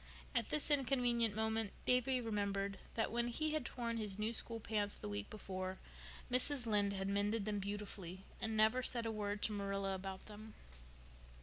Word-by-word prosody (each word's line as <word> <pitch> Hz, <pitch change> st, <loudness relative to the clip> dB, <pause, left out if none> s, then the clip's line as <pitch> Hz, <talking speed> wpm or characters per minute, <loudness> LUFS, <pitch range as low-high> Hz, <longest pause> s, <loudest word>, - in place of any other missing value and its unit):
At 235 Hz, -4 st, +1 dB
this 305 Hz, 0 st, +2 dB
inconvenient 245 Hz, -5 st, +3 dB
moment 220 Hz, -1 st, 0 dB
Davy 250 Hz, +1 st, +4 dB
remembered 200 Hz, -3 st, -1 dB, 0.2 s
that 225 Hz, -, +1 dB
when 235 Hz, +1 st, +1 dB
he 310 Hz, +6 st, 0 dB
had 310 Hz, -3 st, +1 dB
torn 235 Hz, -2 st, -2 dB
his 210 Hz, -3 st, -2 dB
new 215 Hz, +2 st, 0 dB
school 230 Hz, 0 st, -3 dB
pants 210 Hz, -2 st, 0 dB
the -, -, -5 dB
week 100 Hz, 0 st, -3 dB
before, 185 Hz, -2 st, -4 dB, 0.5 s
Mrs. 255 Hz, +1 st, +3 dB
Lynde 205 Hz, -2 st, +3 dB
had 195 Hz, 0 st, -1 dB
mended 205 Hz, +2 st, +1 dB
them 210 Hz, -1 st, 0 dB
beautifully 195 Hz, -2 st, -4 dB, 0.2 s
and 220 Hz, 0 st, -1 dB
never 220 Hz, +4 st, +5 dB
said 240 Hz, -2 st, 0 dB
a 225 Hz, -, 0 dB
word 205 Hz, -1 st, -2 dB
to -, -, +2 dB
Marilla 195 Hz, -1 st, -1 dB
about 190 Hz, 0 st, -5 dB
them. 215 Hz, +1 st, -10 dB
215 Hz, 175 wpm, -39 LUFS, 200-235 Hz, 0.5 s, never